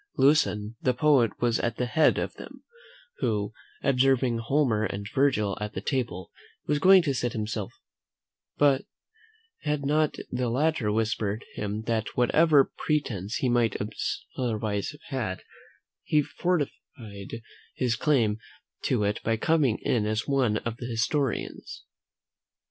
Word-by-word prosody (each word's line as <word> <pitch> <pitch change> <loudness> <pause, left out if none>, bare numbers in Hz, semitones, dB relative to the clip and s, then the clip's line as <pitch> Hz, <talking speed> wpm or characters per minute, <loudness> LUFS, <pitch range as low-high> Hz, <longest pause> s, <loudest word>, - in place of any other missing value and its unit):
Lucan 115 -7 +3
the 125 -1 +1
poet 140 -5 +4
was 120 -1 +1
at 115 -1 -2
the 125 - 0
head 155 +6 +3
of - - -2
them, - - -12 0.6
who, 105 -2 -1 0.3
observing 130 -2 +3
Homer 115 -3 +1
and 100 -1 -3
Virgil 125 -8 +2
at 105 0 -4
the - - -3
table, 120 -10 -3 0.3
was 150 0 +1
going 185 +3 +7
to 145 -4 0
sit 120 -2 -1
down 110 - -2
himself, 105 -2 -4 1.9
had 150 -2 -2
not 150 +1 +2 0.2
the 125 -1 -1
latter 130 -3 +1
whispered 110 -1 -1
him 105 +1 -4
that 110 -1 -2
whatever 145 +3 +4
pretence 115 -10 -1
he 130 - 0
might 120 -3 +2 0.6
otherwise 110 -5 -1
have 150 0 -11 0.2
had, 95 -6 -3 0.6
he 150 -1 +2
forfeited 115 - -4 0.3
his 125 -3 0
claim 115 -6 +2 0.4
to 105 - +1
it 105 0 -1
by 115 0 0
coming 145 -3 +2
in 110 -4 +1
as 110 +1 -1
one 130 -6 +2
of 115 0 -4
the 120 - -6
historians. 125 +3 -2
120 Hz, 135 wpm, -27 LUFS, 110-140 Hz, 1.9 s, going